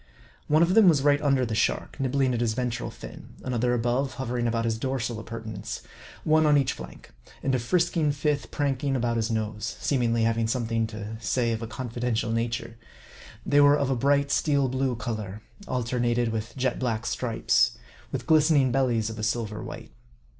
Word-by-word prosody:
One 155 +2 +4
of 175 +2 +2
them 215 -3 +7
was 145 -5 +3
right 145 0 +4
under 135 -3 +2
the 115 - -3
shark, 110 - -1
nibbling 135 -1 +1
at 120 - -1
his 110 -2 0
ventral 125 -2 -2
fin; - - -11
another 125 -1 0
above, 125 +3 0
hovering 120 -2 -2
about 115 0 0
his 110 -1 -1
dorsal 120 -3 -2
ap - - -10
purtenance; 115 -1 -6 0.4
one 155 0 +4
on 150 -1 +5
each 135 -2 +1
flank; - - -11 0.3
and 135 - +1
a 130 - +2
frisking 165 +3 +1
fifth 145 0 -1
prank 140 -3 -1
ing 140 -1 +1
about 120 -2 0
his 110 0 0
nose, 110 0 -3
seemingly 115 -4 +1
having 115 0 +1
something 115 -2 0
to 110 0 -7
say 115 +2 0
of 110 0 -2
a 115 - -4
confidential 120 -1 -2
nature. 115 0 -2 0.7
They 145 0 +4
were 145 0 +6
of 140 -2 0
a - - +2
bright, 140 +3 +2
steel 140 -2 +2
blue 130 0 0
color, 110 -3 -5 0.2
alternated 120 -1 0
with 110 +3 -4
jet 130 -1 0
black 120 -2 -1
stripes; 115 - +1 0.3
with - - -4
glistening 150 -4 +4
bellies 120 -4 +1
of 110 - -8
a - - -4
silver 110 -2 -2
white. - - -8
120 Hz, 185 wpm, -26 LUFS, 115-135 Hz, 0.7 s, them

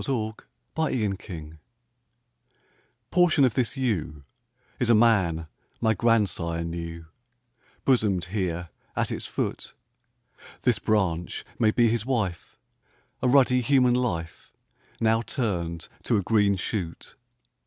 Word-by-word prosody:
â 110 -5 -1 0.4
TRANSFORMATIONS 95 - -3 1.5
PORTION 170 -6 +5
of 125 - +1
this 125 +3 0
yew 80 - -2 0.6
Is 125 - +1
a 115 - +7
man 95 -8 +3 0.3
my 110 -1 +3
grandsire 95 -7 +1
knew, 85 0 -6 0.8
Bosomed 105 -9 +2
here 90 -4 -2 0.3
at - - 0
its - - -4
foot: - - -4 0.9
This 120 -5 +2
branch 90 -6 0
may 110 - +4
be 120 +2 +3
his 115 0 +1
wife, 110 -9 -2 0.6
A - - +2
ruddy 125 -1 +5
human 125 -1 +4
life 95 -10 -2 0.5
Now 115 0 +3
turned 90 - -3
to 115 - +1
a 100 - 0
green 105 0 +3
shoot. 90 -3 -4
105 Hz, 110 wpm, -26 LUFS, 85-120 Hz, 1.5 s, a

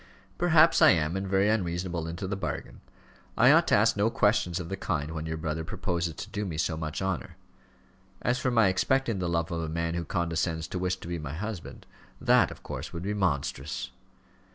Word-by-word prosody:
"Perhaps 165 -2 +5
I - - +9
am, 80 -1 +2
and 95 0 -2
very 95 +1 +2
unreasonable 90 -5 -1
into 85 +4 -5
the 100 - -2
bargain. 100 - -5 0.6
I - - +7
ought - - +5
to - - +4
ask - - +4
no 105 +2 +2
questions 105 -6 +1
of 90 - -5
the 95 - -3
kind 80 -5 -2
when 80 0 -4
your 80 0 -3
brother 80 0 -3
proposes 85 0 -2
to 105 - -7
do 105 0 -2
me 85 -6 -4
so 80 0 0
much 80 +2 -4
honour. 95 -3 -3 0.9
As 125 +2 +1
for 130 - 0
my 115 -4 +4
expecting 115 +3 +1
the 90 -1 -1
love 85 0 -1
of 85 -1 -2
a 80 - -3
man 85 +1 -2
who 85 0 -2
condescends 85 -1 -1
to 90 - -3
wish 90 0 0
to - - -8
be 85 -1 -3
my 75 -2 -6
husband, 105 0 -6 0.3
that, - - +4
of - - -11
course, - - -6
would 85 - -6
be 100 +2 -1
monstrous. 75 -7 -2
85 Hz, 210 wpm, -28 LUFS, 80-100 Hz, 0.9 s, I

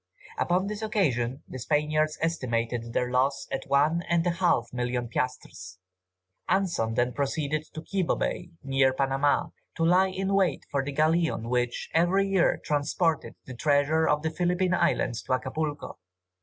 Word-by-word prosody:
Upon 180 +2 +1
this 210 +1 -4
occasion 140 - 0
the 130 - -7
Spaniards 155 +3 0
estimated 120 -7 -1
their 125 +1 0
loss 135 +2 +1
at - - -3
one 145 +5 +3
and 170 0 +2
a 175 - +2
half 170 -10 +1
million 125 0 -2
piastres. 95 -7 -4 0.7
Anson 170 -12 +1
then 125 +1 +1
proceeded 145 +2 -1
to 155 - -6
Quibo 190 0 0
Bay, - - -3
near 135 -1 +2
Panama, 135 +2 +1 0.3
to 165 - +1
lie 185 +3 +4
in 195 +1 -2
wait 190 -6 +1
for 140 -1 0
the 145 - -4
galleon 155 -5 +1
which, 125 -1 -1
every 180 +4 +3
year, 195 -3 +2
transported 155 +2 0
the 130 - -8
treasures 145 +4 +2
of 150 +1 +1
the 160 - -1
Philippine 180 +2 0
Islands 170 -9 +1
to - - -2
Acapulco. 145 +3 -3
150 Hz, 155 wpm, -27 LUFS, 125-170 Hz, 0.7 s, lie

